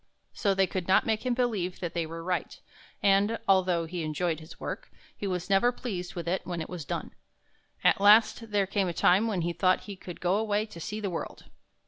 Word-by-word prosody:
So 200 -4 +1
they 195 0 +4
could 185 -1 -4
not 190 - +4
make 220 +3 -1
him 245 - +1
believe 215 -8 -1
that 175 -2 -4
they 170 -2 -1
were 165 +1 -7
right, 180 0 -2 0.4
and, 200 +3 +3
although 185 -3 +3
he 175 +1 -5
enjoyed 160 +1 -1
his 160 +1 -13
work, - - -5 0.3
he 205 - -4
was 180 -2 -2
never 200 +5 +4
pleased 185 -8 -5
with 170 -2 -5
it 185 +2 0
when 175 -2 -4
it 160 - -5
was 175 -5 -6
done. - - -4 0.7
At - - +4
last 220 +2 +5
there 205 -2 +2
came 195 0 0
a 175 - -2
time 190 +6 +4
when 200 -5 -1
he 170 +1 -1
thought 185 +1 +2
he 205 - -8
could 180 -2 -9
go 180 +2 +1
away 210 -1 0
to 210 -6 -11
see 210 +6 -4
the 200 -3 -3
world. 165 - -5
185 Hz, 220 wpm, -28 LUFS, 175-205 Hz, 0.7 s, last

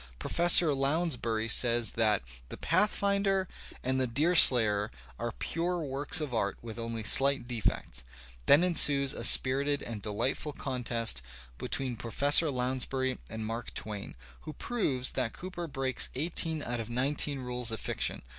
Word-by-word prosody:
Professor 170 - +5
Lounsbury 135 -6 -1
says 120 +1 +4
that 110 - 0 0.3
"The - - -8
Pathfinder" 200 +1 0 0.4
and 130 +1 -1
"The 130 - -1
Deerslayer" 120 -7 +5 0.3
are - - -4
pure 170 - -4
works 140 +4 -2
of 150 -5 -5
art 100 -3 -2
with 115 0 -9
only 115 -1 -5
slight 135 +3 +3
defects. 110 - -3 0.4
Then 145 +5 +5
ensues 145 -6 +4
a - - -8
spirited 140 +4 +4
and 110 -3 -8
delightful 130 +8 -3
contest 120 - -2 0.4
between 130 -3 -4
Professor 145 +8 +3
Lounsbury 130 0 -3
and 110 0 -7
Mark 115 +2 -7
Twain, 105 -2 -6 0.2
who 155 - -10
proves 140 - -1
that 125 -4 -3
Cooper 175 -2 -8
breaks 135 -3 -2
eighteen 160 +1 -2
out 120 0 -5
of 115 0 -7
nine 130 +4 -1
teen 145 -1 -2
rules 125 -2 -3
of 110 -1 -4
fiction. - - -2
130 Hz, 145 wpm, -28 LUFS, 115-150 Hz, 0.4 s, Professor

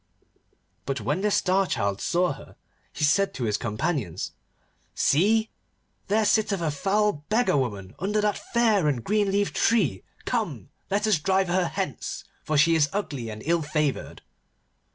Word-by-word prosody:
But 135 -2 -1
when 145 - -1
the 210 - +2
Star 195 -1 +2
Child 100 - -1
saw 175 -3 +1
her, 135 - -14 0.4
he - - -5
said 195 +7 +2
to 130 - -3
his 105 -3 0
companions, 105 - -2 0.6
'See! 220 +9 +3 0.6
There 215 +2 +2
sitteth 210 -2 +2
a 165 -3 -1
foul 195 +1 0
beggar 225 -4 +2
woman 105 -8 -2
under 205 +4 0
that 210 0 +1
fair 220 -8 +2
and 130 -6 0
green 210 -1 +1
leaved 200 +1 0
tree. 165 - +2 0.2
Come, - - -2 0.2
let 205 +2 +1
us 210 -7 +3
drive 190 +3 +1
her 180 0 +2
hence, - - -4 0.2
for 155 - 0
she 165 +3 +5
is 155 -2 +3
ugly 140 - -3
and 110 0 -8
ill 170 +1 +2
favoured. 150 -2 -2
170 Hz, 155 wpm, -26 LUFS, 140-205 Hz, 0.6 s, she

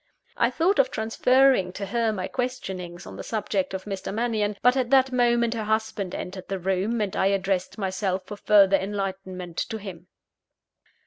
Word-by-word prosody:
I 235 - +3
thought 330 +9 +1
of 265 -1 +4
transferring 250 -3 +3
to 200 +1 -4
her 230 +1 0
my 185 -4 -3
questionings 190 -9 -4
on - - -9
the - - -6
subject 205 -3 -2
of 190 - -5
Mr. 195 -2 -4
Mannion; 215 -2 -1
but 250 +1 +5
at 255 -3 0
that 265 -1 +4
moment 240 -2 +2
her 220 -2 -3
husband 215 -3 -1
entered 185 0 -6
the 195 - -2
room, 190 +5 -1
and 200 -3 -2
I 190 - +2
addressed 195 -1 0
myself 190 -1 -1
for 205 +1 -8
further 200 -2 +5
enlightenment 190 -3 -5
to 220 - -3
him. 185 -4 -9
205 Hz, 175 wpm, -25 LUFS, 190-235 Hz, -, but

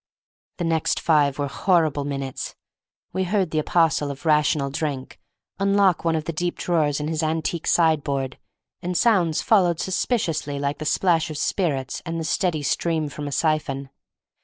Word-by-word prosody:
The 175 - -3
next 165 -1 +1
five 145 -4 +2
were 145 - -1
horrible 155 -1 +1
minutes. 135 -2 -4 0.6
We 190 - 0
heard 190 -2 0
the 155 - +1
apostle 155 -2 +2
of 140 +4 -8
Rational 150 -2 +2
Drink 140 -2 -4 0.4
unlock 195 -2 +3
one 165 -1 +1
of 155 -1 -2
the 165 - -3
deep 175 +2 -2
drawers 155 -4 +1
in 150 - -3
his 160 0 -1
antique 160 +1 -1
sideboard, 145 -5 +1 0.4
and 180 0 -2
sounds 180 -9 +3
followed 180 -7 +3
suspiciously 165 - -1
like 140 +1 -2
the 155 - -5
splash 165 0 +2
of 155 - -5
spirits 145 -6 -1
and 165 -1 -4
the - - -3
steady 160 -1 0
stream 160 +1 0
from 145 0 -6
a - - -4
siphon. 140 -3 -1
155 Hz, 160 wpm, -23 LUFS, 145-175 Hz, 0.6 s, unlock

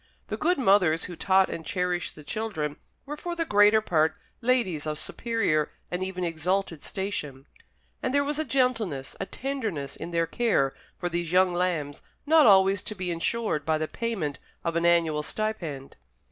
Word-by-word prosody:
The - - -1
good 355 +3 +2
mothers 190 -9 +4
who 180 - -6
taught 190 +2 +3
and 165 - -5
cherished 180 -2 -2
the 150 - -12
children 155 -6 -3 0.3
were 295 +2 -5
for 345 +3 -4
the 335 -1 -1
greater 210 -2 +5
part 160 -6 +1 0.2
ladies 230 -12 +1
of 150 0 -2
superior 195 -9 0 0.2
and 180 +1 -1
even 185 -1 -3
exalted 170 0 -1
station; 150 -9 -4 0.6
and 255 - -1
there 285 +1 +3
was 295 +1 -2
a - - +2
gentleness, 230 - 0
a - - -3
tenderness, 220 - -4
in 165 - -6
their 165 -1 +1
care 165 - +1 0.2
for 175 - -2
these 170 -1 -2
young 185 0 +4
lambs 170 -5 -1 0.2
not 310 -2 +6
always 195 -1 +5
to 215 - -5
be 180 -2 -3
insured 170 -1 0
by 160 +1 +1
the 155 0 -2
payment 195 -12 -3 0.2
of 170 -1 -1
an 170 0 +2
annual 165 -3 +3
stipend. 165 -8 -4
180 Hz, 175 wpm, -27 LUFS, 160-220 Hz, 0.6 s, not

